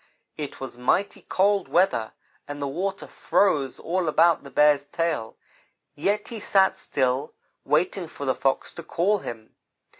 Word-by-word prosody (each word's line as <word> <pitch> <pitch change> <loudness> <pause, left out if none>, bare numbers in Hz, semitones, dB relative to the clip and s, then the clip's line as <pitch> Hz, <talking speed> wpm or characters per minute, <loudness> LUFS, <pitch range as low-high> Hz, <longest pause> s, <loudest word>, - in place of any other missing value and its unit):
It 150 -2 -6
was 130 -2 -8
mighty 190 +11 0
cold 200 0 +1
weather, 170 - +1 0.3
and 145 0 -6
the 140 - -2
water 190 +7 -3
froze 145 -10 +1
all 180 0 -2
about 165 +1 +4
the 140 - -10
Bear's 145 +1 +4
tail, 155 -8 -2 0.6
yet 205 +7 -1
he 230 - -6
sat 195 -1 +3
still, 130 +3 -1 0.3
waiting 170 +5 +1
for 145 -3 -7
the 130 - +2
Fox 135 +2 -1
to - - -8
call 185 +5 +1
him. 115 -9 -8
155 Hz, 150 wpm, -25 LUFS, 135-190 Hz, 0.6 s, about